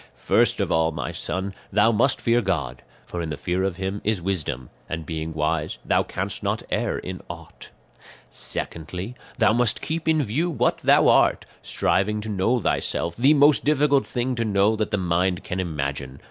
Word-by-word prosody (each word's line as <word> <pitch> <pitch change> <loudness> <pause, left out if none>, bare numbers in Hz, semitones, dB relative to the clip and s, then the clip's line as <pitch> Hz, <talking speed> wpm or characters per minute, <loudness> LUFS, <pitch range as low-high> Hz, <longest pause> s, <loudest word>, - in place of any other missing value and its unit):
"First - - +2
of - - -1
all, 80 0 +2
my 75 -6 -4
son, 95 +1 -3 0.2
thou 105 +3 +4
must 120 +5 +2
fear 120 0 +3
God, 70 - -2 0.2
for 85 - -5
in 80 - -4
the 75 - -4
fear 90 +3 -1
of 95 -2 -1
him 95 +2 -4
is 105 -2 0
wisdom, 85 -9 -3 0.2
and 80 -1 -4
being 80 0 -4
wise 80 0 -1
thou - - +3
canst - - -4
not - - -1
err - - 0
in - - -6
aught. - - -10 0.6
"Secondly, 90 +7 -5 0.2
thou - - +4
must 120 -2 +2
keep 160 0 -4
in 155 -2 +3
view 140 +10 -1
what 125 -7 +1
thou - - +4
art, - - +4 0.2
striving 105 +2 0
to 110 - -6
know 105 +5 +1
thyself, 85 -5 -1
the 135 +6 +4
most 145 0 +5
difficult 145 -2 +3
thing 125 +1 -1
to 115 -2 -1
know 105 0 +2
that 110 -1 -1
the 105 - 0
mind 90 0 0
can 90 - -4
imagine. 70 -5 -4
95 Hz, 185 wpm, -24 LUFS, 80-120 Hz, 0.6 s, most